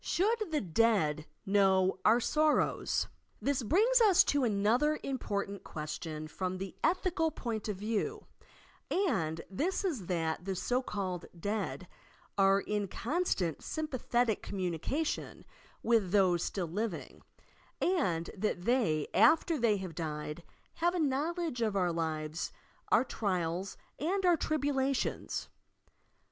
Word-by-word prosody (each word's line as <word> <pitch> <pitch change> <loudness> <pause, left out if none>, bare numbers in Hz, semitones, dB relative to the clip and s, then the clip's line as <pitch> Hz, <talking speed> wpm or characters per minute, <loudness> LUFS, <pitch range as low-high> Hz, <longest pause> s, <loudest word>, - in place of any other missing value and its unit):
SHOULD 430 +4 +1
THE 305 -2 0
"dEAD" 170 -6 +2 0.2
KNOW 190 -1 +3
OUR 225 +3 +6
SORROWS? 305 +5 +1 0.3
This 280 -2 0
brings 440 - +4
us 405 -6 +7
to 285 -2 +1
another 235 +8 +2
important 200 -7 -3
question 155 0 -5
from 185 +3 -3
the 195 0 -6
ethical 345 -1 +2
point 230 -8 -4
of 205 - -2
view, 230 - -2 0.6
and 165 - 0
this 335 - -1
is 260 - -2
that 165 -2 -1
the 195 -1 -2
so 250 +7 0
called 190 -7 -4
Dead 200 -1 -3 0.5
are 195 0 +4
in 210 -1 -2
constant 225 - -1
sympathetic 245 -7 0
communication 190 - -3 0.4
with 225 -5 +3
those 185 -4 +3
still 190 -3 -2
living, 200 +1 -4 0.6
and 185 - +1
that 195 -3 -2
they, 220 - +2
after 330 +1 +5
they 225 -3 +3
have 185 -3 -6
died, 150 0 -4 0.4
have 345 +2 +2
a - - 0
knowledge 305 -1 -1
of 215 -3 +1
our 180 -3 +2
lives, 160 -1 -2 0.4
our - - +6
trials 185 -5 -2 0.2
and 370 +6 0
our 350 -1 +6
tribu 290 -2 0
lations. 270 0 -1
210 Hz, 125 wpm, -32 LUFS, 180-300 Hz, 0.6 s, us